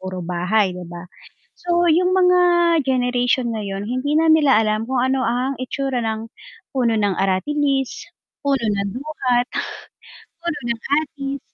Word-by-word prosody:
puro 185 0 -6
bahay, 180 +3 0
'di 180 0 -7
ba? 175 0 -8 0.5
So 345 0 0
'yung 350 +2 +3
mga 360 -1 +4 0.4
generation 245 -2 0
ngayon, 200 -2 -4
hindi 255 +5 -1
na 325 - +3
nila 290 -7 +5
alam 215 0 0
kung 260 -1 0
ano 260 0 +1
ang 250 +3 0
itsura 265 -1 -2
ng 220 0 -3 0.5
puno 240 -4 +2
ng 205 -2 +1
aratilis, 270 +9 -1 0.3
puno 275 -4 0
ng 200 -1 0
duhat, 255 -3 -1 0.9
puno 340 -2 -3
ng 230 -1 -2 0.2
atis. 280 -2 -6
250 Hz, 140 wpm, -20 LUFS, 215-280 Hz, 0.9 s, nila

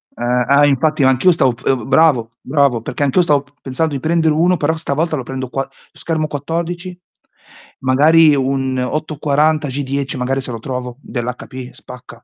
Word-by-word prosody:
Eh, 120 - -6
ah, 125 +4 +3
infatti 145 +1 +2
anch'io 130 +7 +4
stavo 135 -7 +2
p - - -17
ehm, 130 -3 0
bravo, 135 -5 +3
bravo, 135 -4 +1
perché 145 - -3
anch'io 145 +6 +3
stavo 145 -4 +2
p 145 - -29
pensando 145 +4 -2
di 140 - -2
prendere 160 +1 +1
uno, 175 +4 +2
però 160 +1 0
stavolta 160 0 -1
lo 130 - -4
prendo 130 0 -5
qua 135 +2 -3 0.2
schermo 160 -2 -2
14, 170 +5 -4 0.8
magari 150 +4 +5
un 135 -1 -1
840 150 +2 0
G10 140 0 -3
magari 135 +2 -1
se 130 - -6
lo 115 - -5
trovo 125 0 -5
dell'HP, 125 +1 -6
spacca. 125 -3 -12
140 Hz, 165 wpm, -17 LUFS, 130-155 Hz, 0.8 s, magari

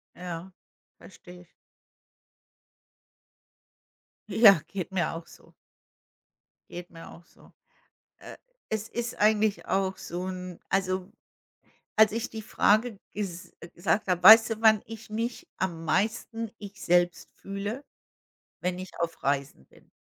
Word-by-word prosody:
Ja, 180 0 -7 0.5
verstehe 180 -2 -14
ich. 175 - -22 2.8
Ja, 200 -8 +7
geht 190 -1 -5
mir 175 -4 0
auch 165 0 -8
so. - - -18 1.2
Geht 175 0 -8
mir 165 -1 -11
auch 170 - -15
so. - - -22 0.7
Äh, - - -11 0.3
es 220 0 -2
ist 235 0 -4
eigentlich 210 0 +2
auch 190 -1 0
so 180 0 -5
'n 180 -1 -7
also, 185 -1 -1 0.8
als 220 -1 +6
ich 230 +1 -3
die 220 -1 -6
Frage 215 +1 +2 0.2
ges 185 -4 -6 0.2
gesagt 175 +3 0
habe, 180 -1 0
weißt 225 +3 +10
du, 225 0 -4
wann 220 -2 +6
ich 225 -1 -10
mich 230 +2 -3
am 165 -3 -3
meisten 225 +4 -1
ich 200 -1 -11
selbst 175 0 +2
fühle? 205 +7 -5 0.8
Wenn 180 0 -1
ich 185 - -8
auf 170 -3 -3
Reisen 140 - -2
bin. - - -23
195 Hz, 125 wpm, -27 LUFS, 175-220 Hz, 2.8 s, weißt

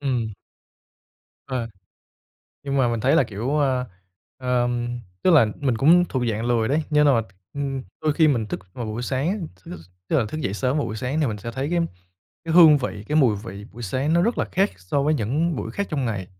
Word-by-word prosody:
Ừm. 120 -6 -1 1.1
Ờ. 125 -3 -3 0.9
Nhưng 140 -1 -2
mà 130 -3 +3
mình 115 -1 -1
thấy - - +3
là, - - +5
kiểu, 115 +8 -2
à 130 -2 +1 0.5
ờm, 120 -1 -1 0.2
tức 185 - +4
là 150 -9 +6
mình 130 -5 +1
cũng 165 +9 +5
thuộc 130 -3 -2
dạng 110 +1 -3
lười 115 -2 +1
đấy, 150 +4 +1
nghĩa 150 0 +4
là, 130 -6 +4 0.3
ư, 145 - -6 0.4
đôi 155 -1 +2
khi 160 0 +4
mình 120 -7 +1
thức 105 - -4
vào 120 -3 -5
buổi 110 +3 -4
sáng, 160 - -1
th 95 +2 -19
thức 90 - -7 0.3
tức - - +2
là 120 - +1 0.2
dậy 95 - -2
sớm 130 +5 0
vào 150 - 0
buổi 110 - -5
sáng 130 +7 -2
thì 150 - +2
mình 105 -4 -3
sẽ 115 +4 -6
thấy 135 +5 -3
cái 175 0 +1 0.6
cái 165 -1 -2
hương 160 -4 +8
vị, 110 -6 -5
cái 150 - +1
mùi 125 -9 +4
vị 100 -2 -8
buổi 120 - -9
sáng 130 - -1
nó 170 +1 +4
rất 235 - 0
là - - +2
khác 195 +2 +2
so 90 +11 -1
với 150 +2 +2
những 150 +7 0
buổi 110 - -4
khác 200 - -3
trong 145 -5 -1
ngày 100 -6 -3
130 Hz, 225 wpm, -23 LUFS, 115-150 Hz, 1.1 s, hương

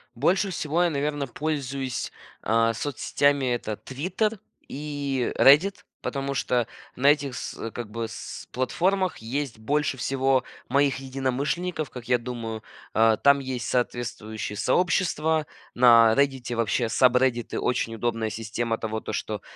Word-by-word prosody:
Больше 190 - +2
всего 160 -1 -1
я, 175 - +3
наверно, 145 -1 -1
пользуюсь, 135 -2 -3 0.3
а, 115 +1 +2
соцсетями- 145 +1 +1
это 110 -3 -3
"Твиттер" 185 - -2 0.3
и 140 -3 -2
"Реддит", 155 +9 +5 0.2
потому 140 0 -3
что 125 -3 0 0.3
на 135 +3 +2
этих 145 -3 +3
с 115 - -5
как 120 -3 -6
бы 115 0 -3
с - - -8
платформах 180 +8 0
есть 125 +2 -3
больше 145 +3 0
всего 135 0 +1 0.3
моих 140 +1 +3
единомышленников, 135 +5 -2
как 125 -2 -9
я 125 -1 +4
думаю. 115 -2 -5 0.3
Э, 110 -1 +4
там 140 0 +6
есть 130 -3 -4
соответствующие 115 -4 -2
сообщества. 160 - +1 0.3
На 115 -2 +7
"Реддите" 135 -3 +1
вообще 115 +1 0
сабреддиты- 125 -1 +2
очень 115 -2 -1
удобная 115 -1 -1
система 115 +1 -2
того, 110 0 -3
то, - - -5
что - - -3
130 Hz, 130 wpm, -26 LUFS, 115-145 Hz, 0.3 s, На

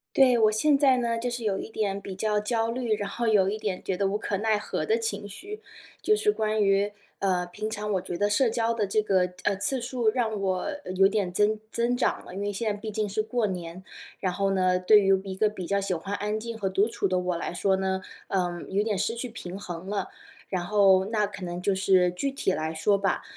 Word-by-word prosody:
对， 255 -3 +6
我 215 -1 +4
现 285 +6 +3
在 270 -3 +4
呢， 235 -1 0
就 245 +1 -2
是 240 0 -4
有 200 -3 0
一 - - -6
点 200 -3 -1
比 195 -1 -7
较 210 +2 0
焦 225 +2 0
虑， 235 -2 0
然 205 -1 -4
后 235 +4 -2
有 205 -4 +4
一 205 - -1
点 205 -4 -3
觉 190 - -2
得 195 - +1
无 205 +2 -1
可 205 - -2
奈 215 +1 +1
何 210 - -3
的 445 +1 +2
情 455 - -3
绪， 405 - -9 0.4
就 425 - +4
是 425 0 +2
关 215 - 0
于 200 +1 +2 0.3
呃， 185 -2 +1
平 215 +5 -5
常 210 -1 -4
我 190 - +2
觉 175 - -5
得 205 0 +2
社 230 +4 +3
交 230 0 0
的 215 -3 0
这 215 +3 +2
个， 185 -4 +1
呃， 200 - +2
次 255 +6 0
数 240 -2 0
让 225 -3 -1
我 190 -2 -1 0.3
有 195 +1 +6
点 195 -3 -1
增 210 +3 +2
增 235 +2 0
长 245 - 0
了。 180 - -10
因 200 - -4
为 205 0 -1
现 215 +2 -1
在 205 - -3
毕 215 +1 -5
竟 210 0 -1
是 210 +2 -1
过 220 +1 0
年， 180 -2 -5 0.4
然 185 - 0
后 195 0 +1
呢， 185 -1 +2
对 210 +4 +6
于 195 -1 +4
一 190 - -5
个 210 +3 +2
比 210 -3 -7
较 200 +3 +1
喜 195 -2 -1
欢 195 +5 -4
安 210 +1 -2
静 230 0 -6
和 195 -3 0
独 195 +2 +2
处 215 -3 -1
的 185 0 +1
我 180 -1 -1
来 - - -4
说 190 +2 +2
呢， 190 0 -1 0.3
呃， 180 -3 -1
有 200 +2 +1
点 210 -3 -1
失 225 +4 0
去 240 +1 -5
平 190 -4 -7
衡 180 -1 -7
了， 205 0 -2 0.4
然 180 -2 -2
后 195 -1 +4
那 210 -1 +1
可 200 -2 -8
能 175 0 -5
就 200 +1 +2
是 190 -2 +4
具 225 +11 -2
体 270 - -1
来 160 -1 -2
说 200 +6 +2
吧， 195 -1 0
205 Hz, 265 characters per minute, -27 LUFS, 190-225 Hz, 0.4 s, 对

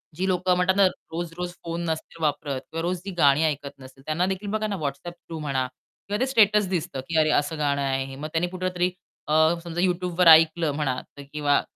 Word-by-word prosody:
जी 185 +3 -1
लोक 185 0 0
म्हणतात 180 +1 +3
ना 200 -1 +5
रोज-रोज 175 0 -6
फोन 170 0 -4
नसतील 160 +1 -5
वापरत 145 -2 -1
किंवा 165 0 -3
रोज 180 +1 -1
जी 200 - -4
गाणी 145 0 +5
ऐकत 145 -2 -2
नसतील, 135 +1 -14
त्यांना 160 +4 0
देखील 190 +2 -3
बघा 215 0 -1
ना 205 - -2
WhatsApp 140 +4 -4
थ्रू 165 -2 -9
म्हणा 135 -3 -1
किंवा 205 +9 -8
ते 260 - +2
स्टेटस 210 -5 +4
दिसतं, 175 -5 -2
की 165 - 0
अरे 155 0 +3
असं 150 +2 -6
गाणं 140 -1 0
आहे 135 -1 0
हे. 135 0 -9
मग 150 +3 -5
त्यांनी 165 +2 +1
कुठेतरी 185 0 -1 0.4
अ, 150 - 0 0.3
समजा 170 0 -3
YouTubeवर 180 -1 +1
ऐकलं 160 0 +4
म्हणा 140 -4 -1 0.3
किंवा 145 -1 +2
165 Hz, 205 wpm, -25 LUFS, 145-180 Hz, 0.4 s, ना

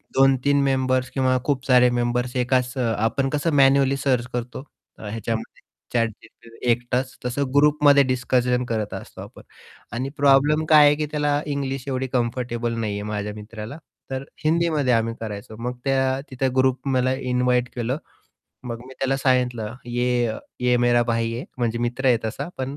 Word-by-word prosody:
2-3 135 +1 +4
members 130 -1 +1
किंवा 130 -1 +1
खूप 135 -3 -1
सारे 125 -1 +5
मेंबर्स 120 +1 -1
एकाच 125 +1 0
आपण 115 +3 0
कसं 150 +3 0
मॅन्युअली 135 0 +4
सर्च 130 -3 +1
करतो 120 +1 -4 0.4
ह्याच्यामध्ये 110 +1 -5 0.3
ChatGPT 115 0 -4
एकटाच 125 +2 0
तसं 125 +3 -1
ग्रुपमध्ये 145 -1 +5
डिस्कशन 125 -1 +1
करत 110 -2 -2
असतो - - -8
आपण. - - -11 0.5
आणि 130 +3 -3
प्रॉब्लेम 145 +3 +4
काय 150 -2 +8
आहे, 145 0 +5
की 150 0 -2
त्याला 145 -1 +1
इंग्लिश 135 -2 -3
एवढी 130 -1 -2
कम्फर्टेबल 120 -1 -1
नाहीये 105 -2 -2
माझ्या 105 0 -3
मित्राला. 110 +5 -8 0.3
तर 130 0 -3 0.2
हिंदीमध्ये 155 -4 +2
आम्ही 115 0 +1
करायचो 110 0 -7
मग 125 0 -3
त्या 135 0 +1
तिथे 130 +1 0
ग्रुप 130 +1 +1
मला 130 0 +2 0.2
इन्व्हाईट 125 0 +1
केलं. 125 +4 -1 0.7
मग 115 -1 -5
मी 130 - -12
त्याला 135 0 0
सांगितलं 125 -4 0 0.2
ये 120 0 +1 0.3
ये 125 0 +3
मेरा 120 0 +3
भाई 115 -1 0
हे 120 +3 -5
म्हणजे 120 -1 -1
मित्र 120 +3 -2
आहे 125 -2 +5
तसा 110 +8 -4
पण 135 +2 -4
125 Hz, 155 wpm, -23 LUFS, 120-135 Hz, 0.7 s, काय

